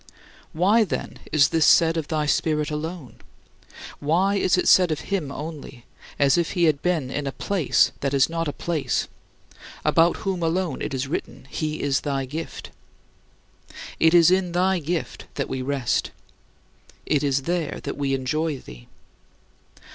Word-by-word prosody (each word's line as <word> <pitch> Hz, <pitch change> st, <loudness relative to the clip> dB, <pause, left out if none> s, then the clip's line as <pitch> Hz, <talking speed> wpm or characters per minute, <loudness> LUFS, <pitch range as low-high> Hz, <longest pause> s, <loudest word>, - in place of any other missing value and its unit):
Why, 200 Hz, +8 st, +3 dB
then, 210 Hz, -, -5 dB
is 145 Hz, -2 st, +4 dB
this 165 Hz, -1 st, +2 dB
said 165 Hz, -1 st, +5 dB
of 160 Hz, -3 st, -2 dB
thy 155 Hz, -2 st, -1 dB
Spirit 150 Hz, 0 st, 0 dB
alone? 155 Hz, -2 st, -6 dB, 0.8 s
Why 175 Hz, +7 st, +2 dB
is 185 Hz, -2 st, +2 dB
it -, -, 0 dB
said 180 Hz, -2 st, +6 dB
of 155 Hz, -, -2 dB
him 170 Hz, -8 st, -1 dB
only 145 Hz, -5 st, -8 dB, 0.3 s
as 140 Hz, +4 st, +3 dB
if 170 Hz, -, -1 dB
he 175 Hz, -3 st, +1 dB
had 155 Hz, -3 st, +3 dB
been 160 Hz, -8 st, -1 dB
in 145 Hz, 0 st, -3 dB
a -, -, -2 dB
"place" 190 Hz, +2 st, +1 dB
that 140 Hz, -, -1 dB
is 140 Hz, -2 st, +3 dB
not 165 Hz, 0 st, -3 dB
a -, -, -1 dB
place 160 Hz, -1 st, -2 dB, 0.8 s
about 165 Hz, +1 st, +4 dB
whom 190 Hz, -2 st, -1 dB
alone 165 Hz, -2 st, -1 dB
it -, -, -3 dB
is 130 Hz, +1 st, -2 dB
written, 140 Hz, -, -5 dB
"He 155 Hz, -1 st, -3 dB
is 140 Hz, -1 st, +1 dB
thy 140 Hz, -2 st, -2 dB
gift"? 155 Hz, +5 st, -7 dB, 1.3 s
It 160 Hz, +1 st, +5 dB
is 170 Hz, 0 st, +7 dB
in 185 Hz, -2 st, +1 dB
thy 185 Hz, +1 st, +2 dB
gift 165 Hz, +2 st, -4 dB
that 140 Hz, -, -2 dB
we 130 Hz, -1 st, -3 dB
rest. 135 Hz, -2 st, -1 dB, 1.0 s
It 145 Hz, -3 st, +1 dB
is 140 Hz, -2 st, 0 dB
there 170 Hz, -2 st, -2 dB
that -, -, -4 dB
we 140 Hz, -1 st, 0 dB
enjoy 150 Hz, +3 st, -1 dB
thee. -, -, -13 dB
155 Hz, 160 wpm, -24 LUFS, 140-175 Hz, 1.3 s, is